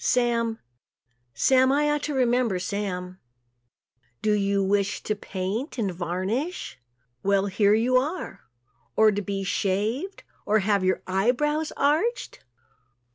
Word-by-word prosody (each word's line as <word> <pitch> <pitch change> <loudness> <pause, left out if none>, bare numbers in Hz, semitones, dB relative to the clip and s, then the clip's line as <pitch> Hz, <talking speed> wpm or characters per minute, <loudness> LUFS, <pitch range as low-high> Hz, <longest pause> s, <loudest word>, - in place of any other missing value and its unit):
Sam, 235 -2 +1 0.8
Sam 260 - +4
I 295 +2 +2
ought 295 0 0
to 295 - -3
remember 245 -5 +2
Sam. 185 -1 -4 1.0
Do 215 - +2
you 200 -1 +1
wish 200 +1 0
to 215 - 0
paint 205 - -4
and 200 -6 -1
varnish? 185 - -3 0.4
Well, 200 0 +2
here 200 +1 +3
you 245 +3 +3
are. 285 - -3 0.5
Or 220 0 +5
to 205 0 -2
be 195 0 -3
shaved 215 - -1 0.2
or 215 - +2
have 200 -1 +1
your 185 0 +1
eye 190 +4 +1
brows 295 +4 0
arched? 325 - 0
215 Hz, 130 wpm, -25 LUFS, 195-255 Hz, 1.0 s, Or